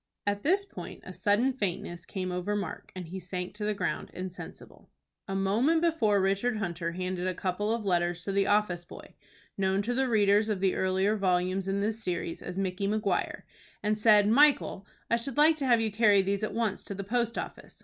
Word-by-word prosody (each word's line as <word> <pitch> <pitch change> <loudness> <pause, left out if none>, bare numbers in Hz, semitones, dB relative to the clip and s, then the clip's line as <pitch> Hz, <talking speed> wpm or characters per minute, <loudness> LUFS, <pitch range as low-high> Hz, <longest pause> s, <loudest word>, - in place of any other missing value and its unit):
At 205 0 0
this 385 - +2
point - - -9
a 185 - -8
sudden 205 +8 +2
faintness 175 -6 -4
came 185 -2 -3
over 180 +3 -2
Mark, 200 -5 -5
and 180 -3 -7
he 190 +2 -5
sank 180 0 -5
to 210 +1 -4
the 210 0 0
ground - - -2
insensible. 185 -1 -9 0.4
A 195 - -3
moment 230 - +2
before 260 -12 +3
Richard 195 +5 +1
Hunter 170 -4 -3
handed 185 0 -3
a 185 - -1
couple 190 +4 -1
of 230 -2 -2
letters 175 -2 0
to 200 - -3
the 195 0 +2
office 205 -4 +1
boy, - - -12 0.5
known 190 +1 +1
to 240 +4 -1
the 265 +1 +1
readers 210 -1 +3
of 205 -3 0
the 190 -1 +2
earlier 190 +3 +1
volumes 185 -1 0
in 195 +1 0
this 220 +2 -2
series 170 -2 -3
as 180 - -6
Micky 195 0 -1
Maguire, 210 -3 -1 0.4
and 210 +1 +2
said, 210 -1 +5
"Michael, 260 -5 +3 0.2
I 235 - +4
should 240 +2 -5
like 310 +2 +6
to 275 -3 -1
have 240 -2 +5
you 220 -1 0
carry 205 -2 +4
these 195 +1 -1
at 215 - -3
once 225 -4 -1
to 200 - -6
the 200 - -5
post 235 +2 -1
office. - - -7
200 Hz, 205 wpm, -29 LUFS, 185-220 Hz, 0.5 s, like